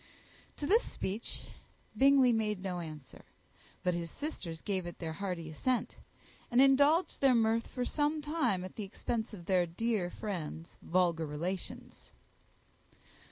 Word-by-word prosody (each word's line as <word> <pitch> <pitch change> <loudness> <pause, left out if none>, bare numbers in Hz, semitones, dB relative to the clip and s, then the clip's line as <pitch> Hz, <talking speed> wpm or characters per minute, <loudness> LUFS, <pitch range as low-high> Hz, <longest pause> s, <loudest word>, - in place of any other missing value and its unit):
To 290 - -3
this 435 +9 +5
speech 205 +4 -4 0.5
Bingley 270 -2 +6
made 210 -3 0
no 180 -2 -2
answer; 155 -5 -9 0.6
but 180 - +2
his 170 -1 -3
sisters 175 - -5
gave 190 -4 -1
it 175 - -7
their 160 -2 -4
hearty 180 -3 -4
assent, 250 - -1 0.5
and 240 - +3
indulged 285 +5 +5
their 270 -2 +6
mirth 225 0 +2
for 250 -1 -3
some 300 +3 +1
time 295 - 0
at 185 - -10
the 215 - -3
expense 220 +3 -3
of 185 -6 -9
their 180 -2 +3
dear 205 +1 -1
friend's 170 -5 -6
vulgar 170 -3 +1
relations. 170 +5 -5
200 Hz, 140 wpm, -33 LUFS, 175-255 Hz, 0.6 s, Bingley